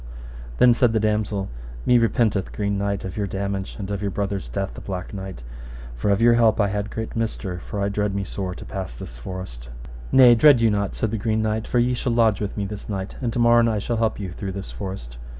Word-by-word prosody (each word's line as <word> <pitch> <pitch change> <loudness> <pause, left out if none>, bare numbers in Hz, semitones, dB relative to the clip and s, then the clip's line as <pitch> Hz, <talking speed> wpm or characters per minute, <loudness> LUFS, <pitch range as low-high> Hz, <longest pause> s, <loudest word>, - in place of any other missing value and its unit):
Then 125 -1 +6
said 120 -1 +3
the 110 - +2
damosel, 105 -2 0 0.4
Me 125 -1 +5
repenteth, 115 -4 +1
Green 100 -1 -1
Knight, 100 0 -2
of 95 -1 -6
your 100 -1 -1
damage, 100 0 -3
and 100 -1 -5
of 100 -1 -3
your 100 - -1
brother's 100 0 -3
death, 95 -1 -3
the - - -9
Black 90 -1 -5
Knight, 95 -9 -7 0.5
for - - -1
of 100 0 +3
your 120 0 +7
help 115 -2 +4
I 100 -2 +3
had 105 +1 -2
great 110 +1 -5
mister, 110 -5 -2
for 100 - -6
I 100 - +1
dread 100 0 -1
me 100 - -1
sore 95 -1 -4
to - - -9
pass 95 - -5
this - - -9
forest. - - -7 0.4
Nay, 125 -2 +8
dread 130 +2 +6
you 115 -1 +4
not, 100 -1 -1
said 110 - -1
the 110 - -2
Green 110 0 0
Knight, 110 0 -1
for - - 0
ye 120 +1 +3
shall 120 0 -1
lodge 115 -3 +3
with 105 0 -3
me 100 - -1
this 105 +1 -7
night, 95 -1 -4
and 120 -3 -1
to 120 - -4
morn 120 0 +5
I 110 -2 +1
shall 115 +3 -2
help 110 -1 0
you 95 -3 -4
through 95 +2 -5
this 100 0 -6
forest. 95 -12 -7
100 Hz, 240 wpm, -23 LUFS, 95-115 Hz, 0.5 s, Nay